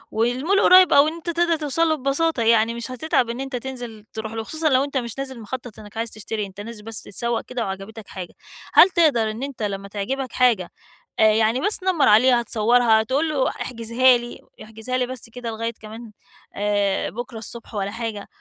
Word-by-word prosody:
والmall 255 - +1
قُريّب 365 -2 +7
أو 280 +2 +6
إن 315 - -2
أنت 335 +1 -7
تقدر 340 0 +2
توصل 315 +2 0
له 315 - +2
ببساطة 275 -1 0
يعني 225 0 +3
مش 235 +2 -6
هتتعب 255 -3 0
إن 235 +2 -4
أنت 270 -1 -5
تنزل 240 -4 -7
تروح 220 0 -5
له، 225 - -3
وخصوصًا 310 +6 -1
لو 260 0 +3
أنت 280 -1 -3
مش 235 -1 -4
نازل 265 -3 -5
مخطط 240 0 -7
إنّك 210 +1 -12
عايز 230 0 -2
تشتري، 215 0 -4
أنت 195 +1 -10
نازل 220 -1 -9
بس 225 0 -5
تتسوق 235 +3 -2
كده 250 -2 -4
وعجبتك 195 +3 -7
حاجة، 185 -2 -8 0.4
هل 375 - +8
تقدر 285 -12 +2
إن 230 +5 -6
أنت 275 -6 -5
لمّا 200 -1 -3
تعجبك 240 +6 -4
حاجة 235 -8 +2 0.5
آآ - - +5
يعني 225 +3 +2
بس 415 +2 +1
تنمَّرعليها، 255 - +4
تصورها، 225 0 +3
تقول 280 +7 0
له 275 -4 +1
احجزها 240 +1 +2
لي، 240 0 -8 0.2
احجزها 220 +4 -4
لي 250 - +1
بس 250 -2 -7
كده 240 0 -6
لغاية 230 +1 -3
كمان 220 +1 -10 0.4
آآ 205 -1 0
بُكرة 240 +1 -7
الصبح 230 +1 -8
ولا 200 0 -2
حاجة، 225 -3 -5
235 Hz, 195 wpm, -22 LUFS, 220-265 Hz, 0.5 s, هل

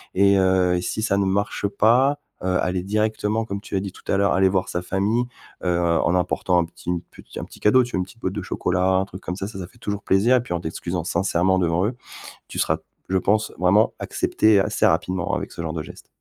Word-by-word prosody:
et 100 +1 +5
heu 95 -1 +3
et - - -2
si 110 - -3
ça 105 -3 +1
ne 100 - +2
marche 100 +1 0
pas, 120 +8 +3 0.2
heu, 95 - -1
aller 90 0 -1
directement 110 +2 0
comme 100 -2 -5
tu - - -6
as - - +2
dit 100 0 -5
tout - - -17
à 95 - +3
l'heure, 100 0 +3
aller 95 0 +4
voir 95 -1 0
sa 90 - -2
famille, 100 +6 0 0.4
heu, 90 -1 +1
en 85 +1 +2
emportant 90 0 +1
un 85 - +1
petit 85 +1 -10
une 90 -1 0
petit - - -12
un - - -5
petit - - -15
cadeau 130 +5 +5
tu 120 - -7
vois, 95 - -1
une 90 - -1
petit 105 +5 -17
boite 95 -4 -2
de 105 - -3
chocolat, 90 -1 -1
un 95 +1 +2
truc 95 0 -10
comme 90 - -4
ça 95 0 -4
ça, 105 -3 -8
ça 90 - -6
fait 120 - -23
toujours 100 -2 -4
plaisir 110 +7 +4
et - - 0
puis 120 - -5
en 85 - -1
t'excusant 85 +1 -4
sincèrement 95 +1 +1
devant 85 +2 +1
eux, 120 - -4 0.5
tu - - -6
seras, - - +2 0.3
je 95 - +2
pense, 105 +3 +1
vraiment 100 +5 +4
accepté 110 -2 +2
assez - - +1
rapidement 90 -2 +1
avec - - -4
ce - - -7
genre 80 -1 -3
de 80 - -3
geste. - - -12
95 Hz, 250 wpm, -23 LUFS, 90-105 Hz, 0.5 s, et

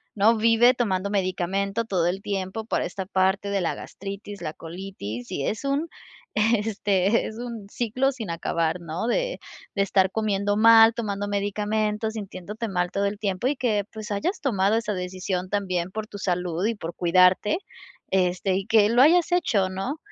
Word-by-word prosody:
¿no?, 220 +3 +4
vive 230 +3 +5
tomando 200 -5 -1
medicamento 195 +2 -1
todo 180 -5 +1
el 190 +3 -2
tiempo 200 +2 -3
para - - -1
esta 190 +1 -5
parte 190 +1 +1
de 200 -2 0
la 170 - -1
gastritis, 200 +1 -8
la 155 - -4
colitis 165 - -7
y 140 - -2
es 215 +4 -2
un 280 +4 0 0.5
este 210 -2 +2
es 220 - -8
un 235 -4 -6
ciclo 250 +5 0
sin 225 -8 -7
acabar, 165 0 -1
¿no?, 170 +7 -4
de - - -1 0.4
de 200 - +1
estar 190 -1 +2
comiendo 205 -2 0
mal, 225 0 +8
tomando 205 -3 -3
medicamentos, 210 +2 -1
sintiéndote 210 +1 -6
mal 180 -2 -1
todo 200 0 0
el 200 +1 -2
tiempo 200 +3 -1
y 290 - +1
que, 215 -6 0
pues, 215 -1 -7
hayas 330 - -1
tomado 210 -5 +2
esa 225 -2 -2
decisión 185 0 -3
también 185 -4 -1
por 215 +1 -5
tu 205 - -9
salud 180 -1 -1
y 230 +1 0
por 170 -4 -6
cuidarte. 185 - +4 0.5
Este 185 0 +1
y 195 - -2
que 215 -1 +4
lo 240 +2 +4
hayas 345 +3 +4
hecho, 210 - +2
¿no? 195 +11 -3
200 Hz, 175 wpm, -25 LUFS, 185-225 Hz, 0.5 s, mal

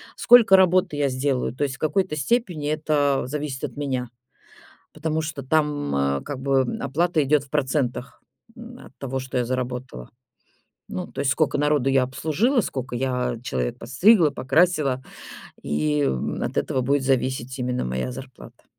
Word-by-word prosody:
сколько 230 -5 +7
работы 185 -4 +3
я 145 -1 +1
сделаю. 130 -1 -1
То 130 - -3
есть 135 -1 -2
в - - -18
какой-то 155 +2 0
степени 160 - -1
это 150 -3 +1
зависит 145 0 -4
от 125 - -8
меня, 130 -4 -3 0.8
потому 160 0 -2
что 155 -3 -5
там, 150 - 0
э, 70 0 0
как 140 -3 -6
бы 135 0 +2 0.2
оплата 160 +4 +1
идет 145 +1 +2
в 140 - -18
процентах, 130 -4 -2 0.4
м, 235 +2 -11
от - - -23
того, 135 -1 -4
что 130 -1 -4
я 125 - +1
заработала. 125 - -4 0.8
Ну, 90 - -4
то - - -8
есть 135 - +1
скока 155 +1 +1
народу 145 -2 +2
я 135 -1 +3
обслужила, 165 - +1
скока 130 -6 -5
я 125 -1 -1
человек 60 - -2
подстригла, 170 - +4
покрасила, 140 -1 +1 0.6
и, 75 0 0
м, 65 -1 -2
от - - -4
этого 130 - 0
будет 140 +2 +1
зависеть 130 -1 -1
именно 125 -1 -2
моя 65 - -3
зарплата. 130 0 -12
135 Hz, 160 wpm, -23 LUFS, 125-155 Hz, 0.8 s, сколько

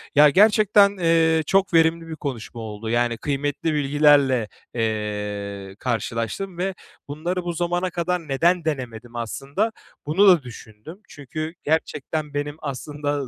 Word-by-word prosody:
Ya, 150 +1 +8
gerçekten, 205 +2 +5
ııı, 165 -2 +3
çok 190 +3 +1
verimli 165 0 +3
bir 160 - -6
konuşma 120 -5 -6
oldu. 110 0 -6
Yani, 120 0 +1
kıymetli 145 +4 -2
bilgilerle, 140 -4 +3 0.3
eee, 105 -3 -3
karşılaştım 120 - -3
ve 190 +2 -1 0.3
bunları 170 +5 -3
bu 175 0 -3
zamana 175 +2 -1
kadar 175 -1 -2
neden 165 +5 +2
denemedim 120 -6 -4
aslında 140 - -2 0.3
bunu 180 +8 +4
da 175 -6 +6
düşündüm. 120 - -12
Çünkü 155 +3 -6
gerçekten 155 -1 -2
benim 145 0 -3
aslında 145 0 -4
145 Hz, 125 wpm, -23 LUFS, 120-170 Hz, 0.3 s, Ya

